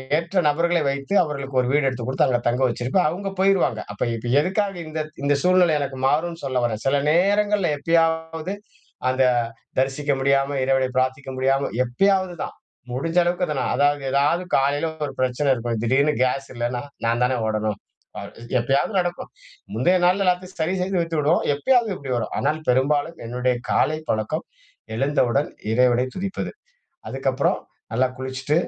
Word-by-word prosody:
ஏற்ற 170 +4 -2
நபர்களை 170 +3 +2
வைத்து 140 +5 -2
அவர்களுக்கு 140 -3 -4
ஒரு 125 - -2
வீடு 145 0 +2
எடுத்துக் 125 -2 -3
கொடுத்து 130 - +2
அங்க 125 -2 +1
தங்க 120 +2 +1
வச்சிருப்பேன். 130 +9 +1
அவங்க 195 +5 -4
போயிருவாங்க. 190 - +3
அப்ப 105 - -3
இப்ப 115 +1 -5
எதுக்காக 195 +5 0
இந்த 155 0 -3 0.2
இந்த 145 0 +3
சூழ்நிலை 180 -2 +4
எனக்கு 140 -2 -4
மாறும்னு 165 +4 0
சொல்லவரேன், 120 -5 -1
சில 135 +1 +3
நேரங்கள்ல 200 +2 +2
எப்பயாவது 160 +2 0 0.6
அந்த, 130 +1 +2 0.5
தரிசிக்க 135 +2 0
முடியாம 140 +1 +2
இறைவன 135 0 +2
பிரார்த்திக்க 130 +1 0
முடியாம, 135 +1 +1
எப்பயாவது 185 +8 +1
தான், - - -4 0.4
முடிஞ்ச 165 +7 -2
அளவுக்கு 175 +1 0
அத 155 - -2
நான் - - -1
அதாவது 145 +1 +2
எதாவது 145 +6 +2
காலையில 145 +4 +1 0.2
ஒரு 140 - -6
பிரச்சனை 130 +3 0
இருக்கும், 115 -2 -2
திடீருனு 140 +5 +3
கேஸ் 135 +2 -1
இல்லன்னா 120 +1 -2 0.2
நான் 115 +1 +1
தான 125 0 +1
ஓடணும், 110 -1 -1 0.4
அ - - -6 0.4
எப்பயாவது 135 - +1
நடக்கும், 175 -1 -3 0.5
முந்தைய 175 +11 +3
நாள்ல 190 +2 +3
எல்லாத்தையும் 180 +1 -1
சரி 170 +4 0
செஞ்சு 185 0 0
வைத்து 165 -2 -2
விடுவோம். 150 +4 +2
எப்பயாவது 235 - +2
இப்டி 135 -2 -6
வரும். 115 - -3
ஆனால் 150 +3 0
பெரும்பாலும் 145 +5 +1
என்னுடைய 125 +1 0 0.2
காலைப் 155 +1 +1
பழக்கம் 110 +9 -1 0.5
எழுந்தவுடன் 135 +1 +1 0.2
இறைவனைத் 125 +1 +2
துதிப்பது. 195 +1 -4 0.6
அதுக்கப்புறம் 135 0 0 0.3
நல்லா 125 +3 +2
குளிச்சுட்டு 130 +2 -3
140 Hz, 155 wpm, -23 LUFS, 130-170 Hz, 0.6 s, சூழ்நிலை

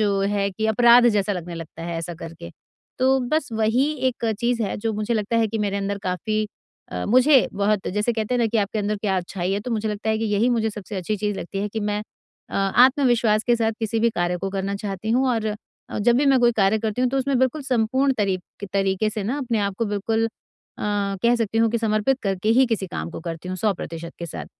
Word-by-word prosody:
जो 200 -2 +2
है 200 0 0
कि 220 +3 -2
अपराध 240 +2 +6
जैसा 205 -2 +1
लगने 175 -2 -5
लगता 165 0 -8
है 170 0 -4
ऐसा 170 +1 -5
करके। 165 - -9 0.5
तो 265 +1 +4
बस 310 -2 0
वही 225 +4 +2 0.2
एक 240 -1 -5 0.2
चीज़ 235 -1 +1
है 200 - -2
जो 225 +1 -2
मुझे 215 +3 -1
लगता 215 +2 0
है 225 -1 +2
कि 225 - -3
मेरे 200 -1 -1
अंदर 200 0 -2
काफ़ी, 215 +4 -1 0.5
अ, - - -3
मुझे 255 +4 +5
बहुत 205 0 0
जैसे 210 +5 0
कहते 220 +2 -2
हैं - - +1
ना, 230 - +3
कि 225 0 0
आपके 210 +2 -1
अंदर 210 +1 -1
क्या 200 -2 -1
अच्छाई 180 +1 -2
है? 200 - -1
तो 245 - -6
मुझे 220 -1 -1
लगता 210 +1 -4
है 220 - +1
कि 225 - -1
यही 210 +3 +2
मुझे 225 -2 +1
सबसे 210 -1 -7
अच्छी 200 +4 -2
चीज़ 205 0 -2
लगती 195 +3 -5
है 205 +1 -1
कि 220 +2 -4
मैं 210 0 -1 0.5
अ, - - -8
आत्मविश्वास 235 +1 +4
के 240 - +3
साथ 225 -1 +1
किसी 225 0 -1
भी 235 - +4
कार्य 175 -2 -1
को 195 - -3
करना 195 +1 -2
चाहती 200 +1 -4
हूँ, 260 +3 +3
और 220 -3 -1 0.5
जब 235 +3 +4
भी 285 +2 +2
मैं 270 -1 +5
कोई 240 0 +4
कार्य 210 0 +2
करती 220 +1 -2
हूँ 250 - +3
तो 270 - 0
उसमें 265 -1 +1
बिल्कुल 260 +3 +1
संपूर्ण 260 +2 +1
तरी 195 -3 +1 0.3
तरीके 195 +2 +1
से 215 -1 -4
ना 260 +7 -1
अपने 240 -5 -1
आप 200 -1 -1
को 230 - +1
बिल्कुल, 220 +2 0
अ, - - -6 0.9
कह 235 +1 +4
सकती 225 -1 -1
हूँ 225 -1 +3
कि 235 - 0
समर्पित 225 +4 +1
करके 195 +1 -1
ही 265 - +6
किसी 215 -5 -1
काम 170 - -5
को - - -7
करती 165 +1 -6
हूँ, 185 - -3
100% 170 -4 -3
के 170 - -4
साथ। - - -7
215 Hz, 240 wpm, -23 LUFS, 195-235 Hz, 0.9 s, अपराध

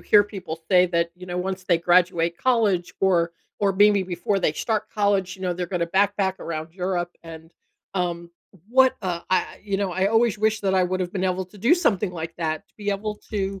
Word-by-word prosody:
hear 205 -1 +5
people 185 -6 -7
say 180 -1 +6
that, 170 -1 0
you 180 0 -11
know, 175 0 -4
once 185 +1 -3
they 175 -2 +3
graduate 170 -1 +2
college 210 -9 +1
or 175 -3 +2 0.3
or 200 -1 +2
maybe 205 0 +5
before 185 +2 -1
they 175 - +1
start 215 +5 -2
college, 200 -3 0
you 190 - -12
know, 180 -1 0
they're 180 0 -3
gonna 175 -1 -1
backpack 195 +1 +1
around 160 0 -5
Europe, 180 -1 -2
and, 165 -1 -11 0.4
um, 170 -2 -2 0.4
what, 260 +1 +5
uh, 175 -3 -2
I 185 - 0
you 200 -1 -2
know, 195 -2 -1
I 190 +2 +1
always 225 +1 +2
wish 215 0 +1
that 195 -1 0
I 185 - +4
would've 180 0 -2
been 190 -2 -2
able 185 0 0
to 185 +3 -17
do 235 - +4
something 210 - +1
like 165 -1 -6
that, 160 +3 -2
to - - -37
be 205 -1 -5
able 210 +1 -3
to, 195 -2 -2
185 Hz, 210 wpm, -24 LUFS, 175-205 Hz, 0.4 s, say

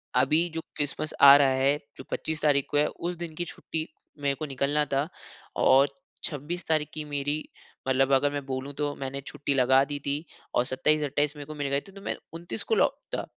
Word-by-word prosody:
अभी 150 +7 +4
जो 165 - -2
क्रिसमस 145 +1 -2
आ 140 0 +12
रहा 140 -2 +5
है 140 +2 +3 0.2
जो 130 - -8
25 160 -1 -2
तारीख़ 140 -2 +3
को 145 - 0
है 150 - +4
उस 175 +1 -4
दिन 170 -2 -6
की 175 - -2
छुट्टी, 160 -1 -5 0.3
मेरे 140 -1 0
को 155 - -4
निकलना 140 +2 0
था 140 +3 +1 0.6
और 135 +2 +7 0.4
26 150 +5 -3
तारीख़ 155 -2 +1
की 155 - -4
मेरी 145 0 -1 0.5
मतलब 135 +1 +3
अगर 140 +2 +4
मैं 145 -1 -4
बोलूँ 135 +1 -4
तो 145 -1 0
मैंने 135 0 -5
छुट्टी 145 -1 -2
लगा 130 +1 +5
दी 145 - -2
थी 145 +3 -1 0.3
और 120 - +3
27-28 145 +2 +1
मेरे 145 -1 -8
को 155 +1 -8
मिल 145 -1 -2
गए 140 0 +1
थे, 195 - -14
तो 195 0 -12
मैं - - -2 0.2
29 165 -9 -4
को - - +1
लौटता। - - 0
145 Hz, 205 wpm, -27 LUFS, 135-155 Hz, 0.6 s, आ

